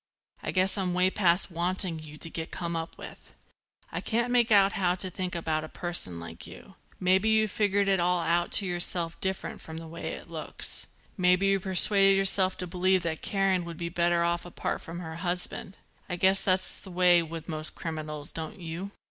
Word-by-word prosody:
I - - -4
guess 190 +2 +1
I'm 180 -2 -1
way 185 +1 +3
past 180 -1 +2
wanting 175 0 -1
you 155 -1 -11
to 165 - -5
get 160 0 -5
come 170 -1 -4
up 165 +1 -5
with. - - -12 0.6
I - - -3
can't 235 +2 -1
make 240 -2 +3
out 200 -1 +6
how 180 -4 +1
to 185 0 -2
think 185 0 -4
about 160 -2 -1
a 155 - -8
person 175 - -4
like 85 - -9
you. - - -13 0.3
Maybe 190 +4 +3
you 220 0 +3
figured 205 -1 +1
it 195 -1 +2
all 180 +1 +2
out 170 +1 0
to 200 - +5
yourself 175 -2 0
different 190 -1 -3
from 160 0 -9
the 165 0 -8
way 165 +1 -6
it - - -9
looks. - - -6 0.3
Maybe 180 +1 +4
you 195 0 +3
persuaded 195 +1 +6
yourself 190 -1 +5
to 180 - -3
believe 185 +1 +1
that 160 -2 -3
Karen 195 -2 0
would 170 -1 -8
be 170 0 -4
better 170 0 +1
off 170 0 0
apart 175 - -4
from 170 +2 -8
her 160 -1 -7
husband. 180 +1 -4 0.3
I 180 - -1
guess 190 +2 +3
that's 185 -1 0
the 195 - -12
way 180 -1 +4
with 165 -1 -7
most 155 -2 -4
criminals, 155 -2 -5
don't 160 +5 -7
you? 170 +3 -6
180 Hz, 200 wpm, -28 LUFS, 170-190 Hz, 0.6 s, out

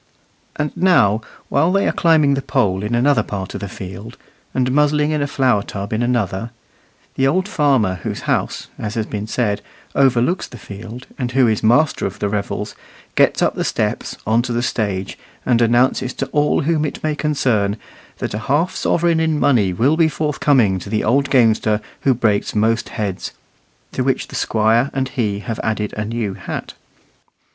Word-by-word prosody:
And 150 -1 -3
now, 115 - +3 0.3
while 160 +6 +2
they 195 +1 +2
are - - +3
climbing 155 -4 +3
the 135 - -1
pole 125 -9 0
in 105 +3 -1
another 130 0 +3
part 100 -3 -5
of - - -6
the 100 - -4
field, 100 +6 -8 0.3
and 125 -1 0
muzzling 150 +1 +2
in 150 -1 0
a 145 - 0
flour 130 -7 +2
tub 100 +1 -5
in 110 - 0
another, 115 -3 -1 0.6
the 135 - +2
old 185 +7 +1
farmer 130 - +1
whose - - -4
house, - - -1
as 105 0 -4
has 110 -2 -1
been 105 0 -5
said, 110 -3 -1 0.3
overlooks 135 +5 +2
the 120 - -11
field, 110 +4 -9
and 125 -1 -2
who 130 -1 +4
is 110 -2 +1
master 125 +6 +3
of 100 +2 -8
the 105 - -1
revels, 100 -1 -3 0.4
gets - - +3
up - - +2
the - - -2
steps - - -2
on 110 +2 +3
to 120 - -4
the 120 0 0
stage, 100 -6 -2 0.3
and 120 -2 +3
announces 120 +2 +2
to - - -2
all 150 0 +2
whom 155 +1 +1
it 150 - -4
may 155 -1 0
concern 125 -10 0 0.4
that - - -4
a 105 - -2
half 145 +10 0
sovereign 170 -1 +1
in 160 -2 +1
money 115 -11 +3
will 130 - +2
be 165 -1 +5
forthcoming 140 -9 +2
to 100 - -9
the 110 0 0
old 140 +5 +2
gamester 110 -4 +3 0.2
who 135 -2 +2
breaks 110 -4 0
most 115 +2 +1
heads; 100 -5 -4 0.6
to - - -1
which - - -1
the - - -8
Squire 115 +4 +2
and 135 -1 -1
he 105 -6 -2
have 115 0 -5
added 105 -1 -2
a 105 - -3
new 110 -2 -2
hat. - - -6
120 Hz, 185 wpm, -19 LUFS, 105-140 Hz, 0.6 s, be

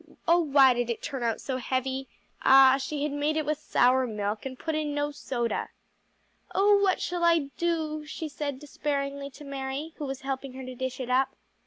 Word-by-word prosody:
oh 340 +1 +6
why 275 -5 +6
did 240 -1 -1
it 235 - -2
turn 270 -3 -5
out 230 -2 0
so 260 -2 -3
heavy? 260 +1 -2 0.3
Ah, 270 0 +7
she 285 +1 -3
had 300 - -1
made 295 +2 0
it 310 - 0
with 305 0 -1
sour 260 -3 +3
milk 210 +2 -3
and 260 -1 -8
put 320 +3 -3
in 305 -1 -1
no 290 0 0
soda. 240 -5 -2 0.9
"Oh 405 +1 +5
what 385 -2 +2
shall 350 -1 -2
I 335 -5 +3
do?" 315 -3 -1
she 315 +1 -5
said 285 -2 -4
despairingly 280 -1 -3
to 280 +2 -13
Mary, 275 +3 -5
who 300 - -4
was 270 0 -5
helping 270 -1 -4
her 260 0 -7
to 255 - -7
dish 260 0 -4
it 250 -1 -3
up. 265 +1 +2
275 Hz, 200 wpm, -28 LUFS, 260-300 Hz, 0.9 s, Ah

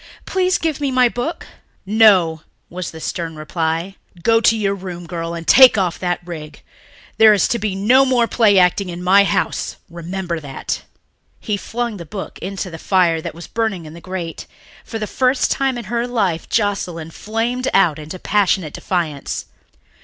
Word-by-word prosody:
Please 370 -1 +1
give 315 -3 -2
me 280 - +1
my 255 -1 +4
book." 245 +8 -4 0.4
"No," 190 -7 +4 0.3
was 180 0 -5
the 160 - -10
stern 165 0 -4
reply. 165 +4 -3 0.3
"Go 225 +2 +4
to 225 0 +4
your 200 -2 0
room, 180 -3 -7
girl, 170 0 -4
and 165 -1 -7
take 260 - +8
off 180 -3 0
that 175 -1 -2
rig. 155 -3 -9 0.6
There 220 -1 +8
is 195 - +2
to 235 - 0
be 205 -2 -2
no 240 +8 +4
more 255 -3 +3
play 215 -5 +3
acting 180 +1 +3
in 175 0 -6
my 195 +2 +5
house, - - -1 0.2
remember 170 0 -4
that." 140 -3 -5 0.6
He 210 - -2
flung 230 +2 -4
the 170 - -8
book 195 +3 -7
into 190 -1 -5
the 165 - -8
fire 175 -4 +2
that - - -6
was 170 - -9
burning 220 -7 -2
in 155 - -10
the 170 - -11
grate. 180 -3 -6 0.4
For 225 - -6
the 215 - -3
first 255 +5 +1
time 270 -2 0
in 240 - -5
her 235 +3 -2
life 200 -9 -1
Joscelyn 180 -6 -1
flamed 230 +7 -2
out 175 -6 +3
into 155 +4 -7
passionate 190 -5 +1
defiance. 165 -7 -3
190 Hz, 175 wpm, -19 LUFS, 170-225 Hz, 0.6 s, take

